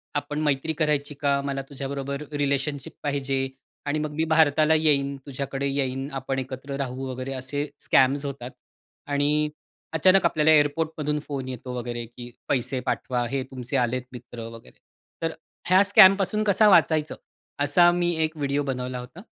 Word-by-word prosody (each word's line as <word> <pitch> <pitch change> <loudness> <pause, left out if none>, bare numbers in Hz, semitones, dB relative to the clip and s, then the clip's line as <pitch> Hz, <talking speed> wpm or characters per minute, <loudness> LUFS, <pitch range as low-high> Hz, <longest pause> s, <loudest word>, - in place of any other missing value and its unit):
आपण 145 +1 -2
मैत्री 150 +1 0
करायची 150 -2 0
का? 140 0 +1
मला 140 -1 -3
तुझ्याबरोबर 140 +1 -4
रिलेशनशिप 140 0 -2
पाहिजे. 140 -2 -1 0.5
आणि 150 +2 -1
मग 150 0 -3
मी 160 - +1
भारताला 155 0 +4
येईन. 140 -3 +2
तुझ्याकडे 140 0 -3
येईन 135 0 -2
आपण 135 0 -3
एकत्र 135 +1 -6
राहू 130 -1 -4
वगैरे 130 +1 -5
असे 135 +3 -3
स्कॅम्स 135 +2 +3
होतात. 135 -3 -6 0.6
आणि 145 +1 +1 0.4
अचानक 185 +4 +4
आपल्याला 160 -2 +3
एअरपोर्टमधून 150 0 +1
फोन 135 -3 -4
येतो 125 0 -6
वगैरे 120 -1 -4
की 120 +1 -10 0.2
पैसे 130 0 0
पाठवा 125 -1 -1
हे 135 +3 -2
तुमचे 130 +1 -3
आलेत 125 0 0
मित्र 120 -2 -9
वगैरे. 115 0 -13 0.5
तर 165 - 0 0.4
ह्या 190 +2 +6
स्कॅम 200 -1 +8
पासून 210 +2 0
कसा 210 +1 +4
वाचायचं? 160 -4 +3 0.5
असा 175 +5 +5
मी 175 0 +1
एक 155 0 -2
व्हिडिओ 140 0 0
बनवला 125 -1 -3
होता. 125 +9 -10
140 Hz, 150 wpm, -25 LUFS, 130-155 Hz, 0.6 s, स्कॅम